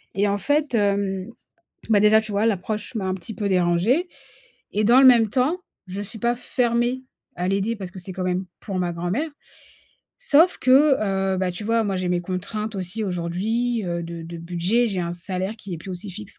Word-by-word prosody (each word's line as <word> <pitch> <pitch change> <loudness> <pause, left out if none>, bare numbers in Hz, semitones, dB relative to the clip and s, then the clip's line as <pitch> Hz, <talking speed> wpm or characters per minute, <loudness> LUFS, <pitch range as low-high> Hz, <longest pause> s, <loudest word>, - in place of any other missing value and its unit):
et 200 +2 +2
en 200 0 +1
fait, 290 -1 +1
hem, 200 -2 0 0.6
bah, 210 -2 +5
déjà, 210 +1 +6
tu 215 -1 -7
vois, 205 +3 +2
l'approche 210 +2 -2
m'a 205 - -2
un 185 - 0
petit 190 +4 -7
peu 210 - -3
dérangée 185 - +2 0.7
et 210 - +1
dans 240 +4 +6
le 265 - +9
même 235 -3 +6
temps, 260 - +1 0.3
je 185 +2 -5
suis 210 +2 -7
pas 240 +1 +1
fermée 245 +1 0 0.3
à 180 +1 -2
l'aider 200 +4 0
parce 190 -4 -7
que 185 - -9
c'est 185 +1 -6
quand 185 0 -4
même 185 +1 -1 0.2
pour 195 -4 -3
ma 175 -1 -1
grand-mère 175 - -2 0.9
sauf 350 -8 +4
que, 275 +3 +5 0.4
heu, - - -1
bah, 185 -1 0
tu 180 +4 -6
vois, 225 +1 +2
moi, 200 - -1
j'ai 185 -1 -2
mes 175 0 +1
contraintes 210 +4 -4
aussi, 190 +4 -3
aujourd'hui, 205 +6 -1
heu, 170 -1 -2
de 170 0 -7
de 170 +1 -8
budget. 175 +8 +1
J'ai 190 -3 -2
un 170 0 -2
salaire 185 +3 -3
qui 200 -4 -7
est - - -7
plus 190 - -9
aussi 185 +2 -5
fixe 200 +2 -8
200 Hz, 210 wpm, -23 LUFS, 180-230 Hz, 0.9 s, le